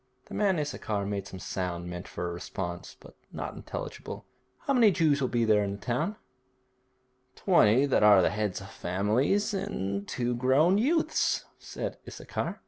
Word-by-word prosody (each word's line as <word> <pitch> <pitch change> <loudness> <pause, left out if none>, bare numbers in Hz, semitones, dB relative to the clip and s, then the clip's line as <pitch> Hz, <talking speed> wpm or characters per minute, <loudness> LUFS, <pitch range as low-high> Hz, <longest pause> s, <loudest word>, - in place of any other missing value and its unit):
The - - -9
man 200 -4 +2
Issachar 110 -9 -2
made 100 -1 -3
some 95 - -8
sound 90 -2 -4
meant 90 +2 -6
for 90 - -4
a 85 - -4
response, 85 0 -6
but - - -15 0.2
not - - -5
intelligible. - - -7 0.4
'How 280 - 0
many 235 -4 +6
Jews 160 -6 +2
will 130 - +2
there 120 -2 +1
be 110 - +3
in 100 -1 +1
the - - -6
town?' 125 - -2 1.2
'Twenty 135 - +4
that 135 - +2
are 100 -4 +7
heads 105 -1 -2
of 100 0 -10
families, 110 - 0
and 100 - -3
two 120 -1 -1
grown 135 +10 +3
youths,' 315 +8 +1
said - - -6
Issachar. - - -4
110 Hz, 160 wpm, -29 LUFS, 95-150 Hz, 1.2 s, are